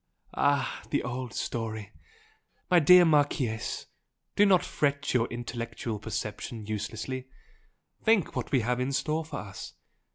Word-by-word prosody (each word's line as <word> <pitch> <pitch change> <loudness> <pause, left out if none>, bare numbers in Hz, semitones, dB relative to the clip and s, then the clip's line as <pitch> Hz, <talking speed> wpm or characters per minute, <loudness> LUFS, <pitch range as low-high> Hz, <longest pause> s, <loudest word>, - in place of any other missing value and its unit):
"Ah! 140 -3 +1
The - - 0
old 125 0 -4
story! 110 -4 -4 0.8
My 175 - +7
dear 180 +3 +8
Marchese, 145 -7 +1 0.5
do 205 - +6
not 185 -3 +4
fret 140 -1 0
your 120 -2 +3
intellectual 115 -2 -5
perception 110 +1 -5
uselessly! 110 +5 -4 0.8
Think 220 -7 +3
what - - -3
we 130 - +3
have 125 +2 0
in 130 +2 -1
store 155 +4 0
for 160 - -6
us! 100 0 -8
125 Hz, 130 wpm, -29 LUFS, 110-145 Hz, 0.8 s, dear